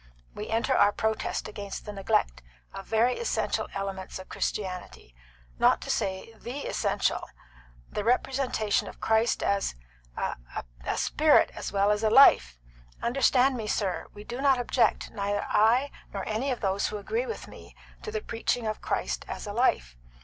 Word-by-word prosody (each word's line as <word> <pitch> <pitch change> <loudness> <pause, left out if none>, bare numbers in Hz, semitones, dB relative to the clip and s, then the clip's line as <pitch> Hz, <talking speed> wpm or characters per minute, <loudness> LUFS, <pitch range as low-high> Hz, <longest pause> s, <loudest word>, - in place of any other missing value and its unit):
We 210 - -6
enter 230 +4 +1
our 205 - +5
protest 220 +1 -2
against 205 -2 -7
the 210 - -6
neglect 190 - 0 0.3
of 195 0 -8
very 230 +3 +2
essential 470 - -1
elements 195 -1 -4
of 185 - -11
Christianity 185 - -4 0.5
not - - +5
to - - -3
say 190 +3 -2
the 260 +4 -6
essential - - 0 0.6
the 210 - -4
representation 250 -2 +1
of - - -10
Christ 225 +1 +2
as 200 - 0 0.4
a - - -2 0.5
a - - -2
spirit 305 0 +4
as - - -5
well 200 +1 +3
as 210 0 +1
a 220 - +3
life. 215 - +6 0.5
Understand 260 +1 +3
me, 220 -3 -4
sir, 195 -3 -1
we 205 - -11
do 240 +4 -6
not 270 -2 +4
object, 245 0 +1
neither 205 -1 -1
I 235 +7 +3 0.2
nor - - -5
any 220 +6 -1
of 250 - -2
those 195 -1 +1
who 210 - -4
agree 455 - -2
with 455 - -6
me, - - -13 0.3
to - - -6
the 435 0 -2
preaching 230 - -2
of 215 0 -3
Christ - - -2
as - - -6
a 205 - -5
life. 60 - +1
220 Hz, 165 wpm, -28 LUFS, 200-250 Hz, 0.6 s, life